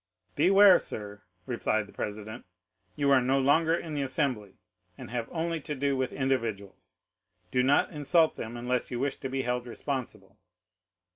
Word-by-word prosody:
"Beware, 195 0 +7
sir," 105 -1 -7 0.2
replied 110 -3 -1
the 100 - -17
president, 110 +3 -6 0.5
"you 140 -1 +1
are 135 -2 +6
no 130 +2 +2
longer 160 +5 +3
in 165 -2 -5
the 145 - -1
assembly, 125 -7 -2 0.4
and - - -10
have 120 -2 -3
only 165 -1 -2
to 150 - -5
do 140 +1 0
with 130 0 -1
individuals; 115 -7 -3 0.5
do 125 - +2
not 135 +3 +3
insult 160 +2 +2
them 115 +1 -6
unless 125 +1 -2
you 120 - -4
wish 140 +1 -1
to 135 - -5
be 135 0 -2
held 125 0 -2
responsible." 120 -6 -6
130 Hz, 160 wpm, -28 LUFS, 115-145 Hz, 0.5 s, Beware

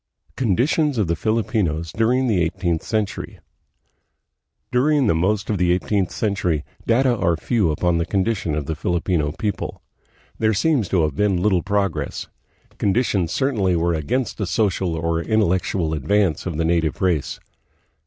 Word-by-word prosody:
Conditions 130 - +1
of 105 - +2
the 85 0 0
Filipinos 95 -6 -1
during 120 +6 +1
the 105 -8 +2
Eighteenth 85 -1 -1
Cen 110 -2 0
tury. 95 - -8 1.3
During 140 +2 +3
the 105 - +3
most 100 +5 0
of 105 -4 -1
the 90 -1 +3
eighteenth 95 +1 0
century, 100 -8 -1 0.2
data 125 +2 +3
are 85 -6 +1
few 105 0 +1
upon 85 +2 +1
the 85 - 0
condition 95 -5 0
of 75 -2 -2
the 80 - -2
Filipino 85 -1 -1
people. 105 +3 -4 0.6
There 110 -1 +2
seems 130 - +1
to 90 -4 +2
have 75 -3 -1
been 100 +1 +2
little 95 -4 +3
progress. 100 -1 -1 0.5
Conditions 100 -4 +1
certainly 110 -10 +1
were 85 +1 +1
against 115 - -2
the 100 - -1
social 95 -4 0
or 85 0 -1
intellectual 95 -4 0
advance 85 +4 +1
of 85 -4 -3
the 80 - 0
native 80 -2 0
race. 85 -7 0
95 Hz, 155 wpm, -21 LUFS, 85-110 Hz, 1.3 s, During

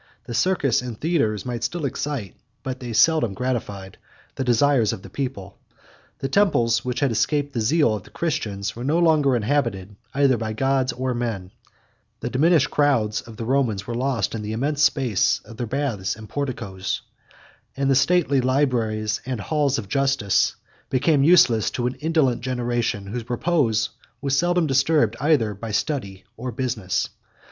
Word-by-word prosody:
The 120 - -7
circus 145 -4 +2
and 120 -3 -7
theatres 110 - 0
might 120 -2 -4
still 170 -3 -2
excite, 135 -7 -3 0.3
but 130 -1 -4
they 120 -2 -6
seldom 115 -2 +3
gratified, 105 -6 -4 0.3
the 135 - -3
desires 125 -1 +3
of 95 - -8
the - - -11
people: 130 -9 -5 0.6
the 135 - -3
temples, 125 - +2
which 125 +1 -3
had 140 -3 +2
escaped 145 +6 0
the 115 - -1
zeal 145 +1 +3
of 105 - -3
the - - -17
Christians, 105 -12 -3
were 120 - -6
no 150 +5 +1
longer 155 -6 +3
inhabited, 110 -5 -1 0.2
either 135 -3 +3
by 110 -1 -3
gods 135 +2 +1
or 130 +1 -2
men; 110 -6 -3 0.7
the - - -4
diminished 155 +1 +3
crowds 125 -8 +2
of 115 -2 -13
the 115 - -4
Romans 120 -6 0
were 120 - -4
lost 125 -2 -1
in 110 - -4
the 105 +1 -4
immense 140 +6 -1
space 125 -10 +2
of 115 - -12
their 120 - -3
baths 120 -7 -2
and 110 0 -11
porticos; 100 -9 -4 0.7
and 135 0 0
the 135 - +4
stately 140 -1 +3
libraries 120 -5 0
and 130 -2 -4
halls 145 +4 0
of 110 -4 -5
justice 135 -5 +1 0.3
became 140 +2 +2
useless 130 - +5
to 120 - -3
an 125 - 0
indolent 150 -7 +1
generation, 120 -5 -1
whose 115 +4 -6
repose 125 -4 +1 0.3
was 140 0 0
seldom 175 +2 +2
disturbed, 135 -4 +2
either 140 -8 +2
by 110 +3 -7
study 100 -6 -2
or 125 +2 -4
business. 120 -8 -2
125 Hz, 165 wpm, -23 LUFS, 110-140 Hz, 0.7 s, useless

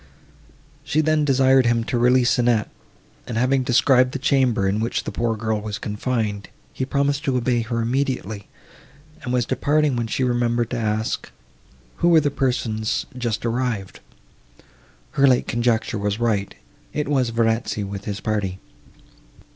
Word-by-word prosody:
She 155 - 0
then 155 -1 +2
desired 130 -2 +4
him 115 0 +2
to 120 +1 -2
release 125 +1 +3
Annette, 120 -3 +1 0.6
and, 115 - -3
having 130 +3 +2
described 125 +1 +3
the - - -1
chamber 130 -7 +2
in 100 +2 0
which 115 +2 -1
the - - -5
poor 115 -1 -1
girl 110 -1 -1
was 105 -1 -4
confined, 105 -1 -3 0.2
he 130 - -2
promised 140 +1 0
to 130 -2 +1
obey 120 -1 +1
her 115 +1 -2
immediately, 120 -5 -2 0.7
and 125 - -5
was 125 -2 +1
departing, 145 +2 +1
when 120 -1 -1
she 130 - -1
remembered 120 -1 0
to 125 - -2
ask 110 0 -2 0.7
who 170 - +1
were 165 -2 +7
the 145 -2 0
persons 115 -5 -1
just 120 -3 -3
arrived. 115 -5 -2 1.1
Her 140 0 +3
late 125 -2 +3
conjecture 115 -2 0
was 100 +1 -1
right; 105 -5 -1 0.4
it 150 -2 -2
was 135 -4 +1
Verezzi, 115 -2 0
with 100 0 -6
his 100 -2 -4
party. 100 -4 -2
120 Hz, 155 wpm, -22 LUFS, 110-130 Hz, 1.1 s, were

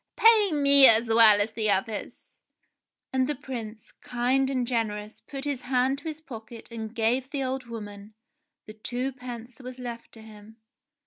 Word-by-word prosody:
Pay 445 -3 +5
me 280 -2 +7
as 225 +1 +4
well 225 -2 +7
as 205 +2 0
the 220 -1 -1
others." 205 +2 -3 0.7
And 260 -1 +1
the 295 - -2
Prince, 235 -5 -8
kind 255 +2 -1
and 255 -2 -1
generous, 215 -3 -3
put 275 0 -8
his 280 -3 -3
hand 260 +2 0
to 290 - -21
his 315 -1 -6
pocket 230 -5 -11
and 225 0 -7
gave 245 +3 0
the 280 -2 -3
old 260 0 -3
woman 210 -2 -9 0.5
the 215 - -10
twopence 245 +1 -6
that 255 - -17
was 255 0 -8
left 240 -2 -8
to 225 - -13
him. 215 0 -15
240 Hz, 170 wpm, -26 LUFS, 220-265 Hz, 0.7 s, me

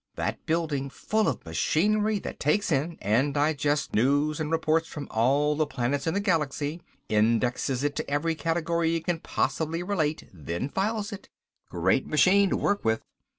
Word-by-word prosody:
That - - -3
building 155 -4 -1
full 215 +9 0
of - - -2
machinery 210 +5 +1
that - - -7
takes 170 +7 +1
in 155 +4 0
and 125 +8 +2
digests 145 0 +1
news 145 +7 +2
and 155 -1 -2
reports 165 0 +1
from 145 -2 -7
all 140 +6 +2
the 155 0 +1
planets 135 +3 -2
in 160 - 0
the - - +2
galaxy, 155 -4 -1 0.3
indexes 115 +4 +1
it 145 0 0
to - - -3
every 145 +3 0
category 165 +1 0
it 165 -1 -3
can 175 -1 0
possibly 165 +1 -1
relate, 160 -6 -1
then 85 - -4
files 205 +4 -1
it. 200 - -9 0.4
Great 95 +9 +1
machine 190 +6 +4
to - - +1
work 205 0 0
with. 110 0 +1
155 Hz, 165 wpm, -27 LUFS, 140-170 Hz, 0.4 s, machine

